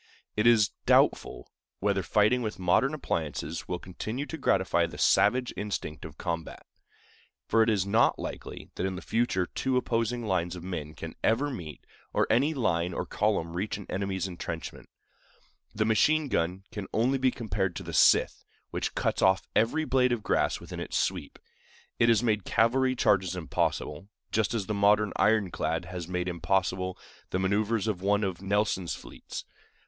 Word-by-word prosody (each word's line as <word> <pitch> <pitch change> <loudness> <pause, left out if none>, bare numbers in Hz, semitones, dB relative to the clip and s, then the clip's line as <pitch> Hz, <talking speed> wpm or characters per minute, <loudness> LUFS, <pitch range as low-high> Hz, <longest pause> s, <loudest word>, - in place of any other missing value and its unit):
It 105 +2 +2
is 110 -4 +5 0.2
doubtful - - +2 0.3
whether 100 -1 +1
fighting 110 +6 +3
with 110 -2 -3
modern 95 - +2
appliances 80 - -3
will 90 - -2
continue 110 +9 -5
to 160 - -6
gratify - - +2
the - - -10
savage 125 +4 +3
instinct 100 -7 -4
of - - -10
combat; 85 -2 -4 0.8
for 115 - +3
it 110 - +4
is 100 -4 +1
not 110 +4 +3
likely - - -7
that 90 - -3
in 95 - -4
the 90 - -7
future 115 -6 +1
two 130 +7 -1
opposing 115 -1 -1
lines 90 -3 0
of 90 - -8
men 80 -4 -5
can - - -7
ever 135 +6 +2
meet, 80 - -8 0.3
or - - +3
any 140 +7 +3
line 85 -8 0
or - - -2
column 95 -6 0
reach 100 +4 -2
an 100 - -9
enemy's 95 0 -2
intrenchments. 85 -2 -6 0.9
The 110 +1 +1
machine 150 +7 +3
gun 90 0 -1
can 105 -2 -6
only 130 +5 +2
be 130 0 +4
compared 95 -6 -2
to 95 - -5
the 85 -1 -7
scythe, - - +4 0.3
which - - -3
cuts - - 0
off 95 0 +3
every 135 +9 +2
blade 125 -3 +3
of 120 -3 -1
grass - - +1
within - - -8
its - - -3
sweep. - - -2 0.6
It 115 - +5
has 115 0 +4
made 105 -4 +1
cavalry 130 +6 +2
charges 95 -6 +2
impossible, 80 0 -2 0.2
just 110 +1 +1
as 105 -4 -1
the 105 - -2
modern 105 +1 +3
ironclad 95 -5 +1
has 90 -1 -6
made 90 0 -2
impossible 90 +1 -1 0.3
the - - -1
manœuvers 105 +3 0
of 100 -5 -1
one 100 +2 +2
of 95 -2 -3
Nelson's 100 -3 0
fleets. - - -9
100 Hz, 170 wpm, -28 LUFS, 90-115 Hz, 0.9 s, is